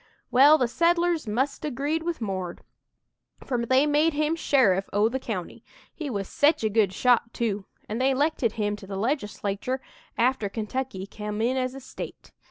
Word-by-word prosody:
"Well, 285 +5 +7
the 250 - +1
settlers 340 +1 +1
must 265 +6 -1
'a' 300 - -1
'greed 290 +5 -1
with 335 -4 -3
'Mord,' 185 -4 -4 0.8
for 245 -3 -1
they 260 +3 +4
made 300 +2 +3
him 305 +2 +1
sheriff 210 - +2
o' 210 +2 +3
the 265 +3 -2
county 210 -9 -5 0.3
he 310 -4 -5
was 200 -5 -3
sech 290 -3 +2
a 220 - +2
good 210 -3 +2
shot, 235 +3 +2
too 210 -4 -1 0.2
an' 220 +3 -3
they 265 +1 +2
'lected 275 -5 +1
him 210 -2 -1
to 195 - -12
the 195 0 -5
Legislatur' 215 0 -2 0.4
after 235 -3 +1
Kentucky 220 -1 -4
come 210 +1 -6
in 240 +4 +1
as 255 0 -1
a - - -6
State. 260 - -9
250 Hz, 180 wpm, -26 LUFS, 210-285 Hz, 0.8 s, Well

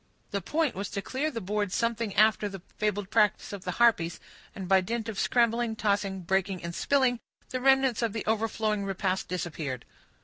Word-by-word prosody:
The 200 -2 -1
point 310 - 0
was 200 +2 -4
to 200 - -3
clear 280 +4 -1
the 245 -7 -4
board 205 0 -2
something 230 -1 -1
after 215 0 +4
the 195 -3 -9
fabled 205 -1 -1
practice 210 -2 +2
of 195 -2 -7
the 180 - -2
harpies, 200 -7 +3 0.4
and 190 -2 -6
by 190 0 +5
dint 230 +4 -3
of 215 -3 -4
scrambling, 235 -1 +2
tossing, 200 -3 0
breaking, 190 +1 -1
and 170 0 -4
spilling, 260 +2 +2 0.3
the 255 - -3
remnants 265 -2 +4
of 230 -2 +1
the 220 +1 -4
overflowing 220 -1 0
repast 190 -1 -1
disappeared. 155 -7 -4
210 Hz, 180 wpm, -28 LUFS, 190-230 Hz, 0.4 s, by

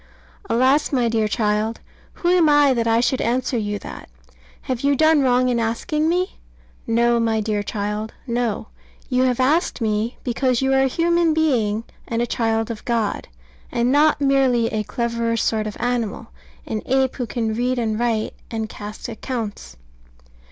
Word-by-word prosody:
Alas, 260 +5 +3
my 250 -4 +2
dear 225 -2 +1
child! 210 +1 0 0.3
who 345 - -1
am 350 -3 +4
I 290 -2 +5
that 230 -2 0
I 230 +1 +3
should 250 +2 +1
answer 250 +2 0
you 205 -2 -1
that? - - -10 0.5
Have 255 -2 -3
you 280 0 +2
done 315 +1 +4
wrong 255 -1 +3
in 245 -2 +1
asking 300 +8 0
me? 365 +3 -1 0.5
No, 235 +1 +3
my 225 -1 +1
dear 210 -1 -1
child; 210 +1 -3
no. 235 -3 -2 0.4
You 255 -1 +2
have 250 -1 0
asked 300 +7 +2
me 220 +1 -1
because 250 0 0
you 265 0 +1
are 265 - +4
a 270 - +3
human 335 +2 +2
being 230 -9 +1 0.2
and 230 - -2
a 240 - +1
child 225 -1 -1
of 220 - -7
God, 230 -4 -1 0.4
and 240 +1 +1
not 295 +2 +4
merely 265 -4 +2
a 215 - 0
cleverer 235 0 -1
sort 215 -1 0
of 210 - -6
animal, 235 -2 -2 0.4
an 215 -1 -3
ape 265 0 +1
who 245 -3 -3
can 225 -1 -2
read 250 +3 0
and 220 -2 -1
write 230 -2 0 0.2
and 220 -1 -3
cast 210 0 -8
accounts. 220 - -5
235 Hz, 170 wpm, -21 LUFS, 220-265 Hz, 0.5 s, I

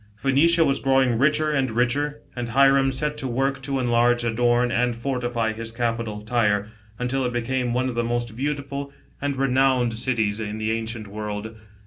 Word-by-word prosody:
Phoenicia 155 +8 +4
was 135 - +1
growing 135 -3 +2
richer 150 +2 +2
and 135 -3 +1
richer, 140 +6 0
and 120 -1 -4
Hiram 135 +2 +4
set 150 +3 -2
to 135 - -3
work 135 +2 -1
to 135 0 -2
enlarge, 120 0 +2
adorn, 120 +1 +2
and 120 0 +1
fortify 120 -2 -2
his 115 0 -6
capital, 115 -2 -2
Tyre, 105 -2 +1 0.3
until 130 +2 -1
it 125 - -1
became 120 +1 -1
one 125 +2 0
o^ 130 - -3
the 120 0 -1
most 120 -1 -2
beautiful 140 +1 -3 0.3
and 140 0 -1
renowned 130 -2 +2
cities, 110 -3 0
in 105 -1 -4
the 110 0 -1
ancient 115 -1 -3
world. 105 +1 -5
120 Hz, 170 wpm, -23 LUFS, 115-135 Hz, 0.3 s, Phoenicia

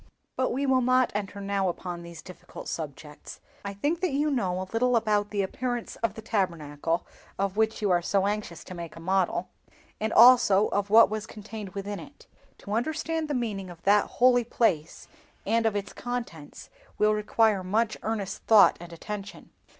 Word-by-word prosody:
But 260 - 0
we 275 +3 -1
will 260 -1 +3
not 255 +1 +3
enter 205 -1 -4
now 195 -1 0
upon 175 0 -5
these 170 -1 -10
difficult 185 - -11
subjects. 150 -1 -7 0.2
I 200 0 -5
think 295 +11 -1
that 370 - +1
you 295 +2 0
know 185 -9 -1
a 185 - -3
little 250 +2 +2
about 210 -2 +1
the 205 -1 -1
appearance 245 +4 -4
of 230 - -2
the 220 - -9
Tabernacle 165 -6 -2 0.3
of 195 0 -1
which 220 0 0
you 200 - +2
are 175 -1 +3 0.2
anxious 205 -5 -3
to - - -9
make 170 -2 -8
a - - -10
model, 185 0 0 0.5
and 220 +1 -1
also 230 -4 +6
of 205 0 -1
what 225 +1 +7
was 215 0 -4
contained 210 -2 -9
within 200 +1 -4
it. 285 - -14 0.3
To 205 - -7
understand 315 +6 -1
the 295 - -2
meaning 205 -6 -3
of 170 -1 -13
that 205 +1 +4
holy 245 0 +5
place, 175 -9 -1 0.4
and 225 +2 +2
of 215 - -1
its 205 0 -4
contents, 235 -12 -6 0.3
will 215 0 +3
require 210 -1 +2
much 215 +4 0
earnest 210 -3 -3
thought 220 -2 +7
and 175 0 -10
attention. 200 +4 -8
205 Hz, 180 wpm, -27 LUFS, 185-230 Hz, 0.5 s, what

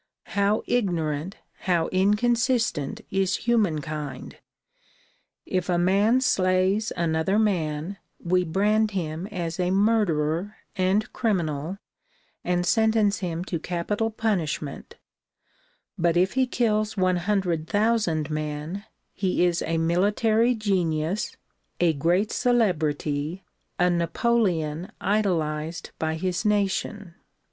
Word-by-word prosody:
How 200 +1 +2
ignorant, 170 -6 -1 0.3
how 170 -2 +3
inconsistent 220 - +1
is 195 -1 +1
humankind! 155 - -1 1.1
If 185 -1 -2
a 175 - +2
man 200 +8 +3
slays 190 -2 +2
another 170 +3 +1
man, 175 -4 0 0.2
we 180 +1 +1
brand 210 +6 +2
him 165 +1 -3
as 175 -4 -4
a 180 0 +1
murderer 195 -3 +1 0.2
and 190 +2 +1
criminal 170 - -1 0.7
and 175 0 0
sentence 220 0 +2
him 175 -2 -3
to 170 -3 -3
capital 185 +7 -2
punishment 180 -10 -2 1.0
but 170 0 +2
if 185 +2 +2
he 260 -1 +2
kills 215 -3 0
one 185 -1 +2
hundred 175 -4 0
thousand 205 -8 +1
men 155 +6 -4 0.3
he 185 -2 +1
is 175 -1 +1
a 165 - -1
military 210 +8 +2
genius, 185 -4 -1 0.4
a 170 -2 +3
great 175 +8 +1
celebrity, 160 -7 0 0.3
a 180 0 +3
Napoleon 170 -2 0
idolized 165 -6 -1
by 160 0 -1
his 180 +3 -2
nation. 205 -2 -1
185 Hz, 105 wpm, -25 LUFS, 165-210 Hz, 1.1 s, how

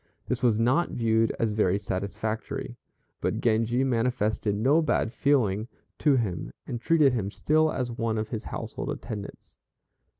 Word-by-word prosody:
This - - -1
was 115 -4 +3
not 125 +9 +2
viewed 115 -1 +2
as 115 -2 +1
very 100 -3 +2
satisfactory; 100 - -4 0.5
but - - -1
Genji 115 +2 +2
manifested 115 -4 0
no 135 +10 +3
bad 125 -7 0
feeling 115 -8 +2 0.3
to 145 -3 +4
him, 105 -9 -2
and 120 -1 -5
treated 150 -4 +4
him 105 -5 -1
still 155 +8 +2
as 125 -2 -2
one 115 -1 -1
of 110 0 -2
his 110 -2 -4
household - - -5
attendants. 105 -2 -7
115 Hz, 145 wpm, -27 LUFS, 105-125 Hz, 0.5 s, to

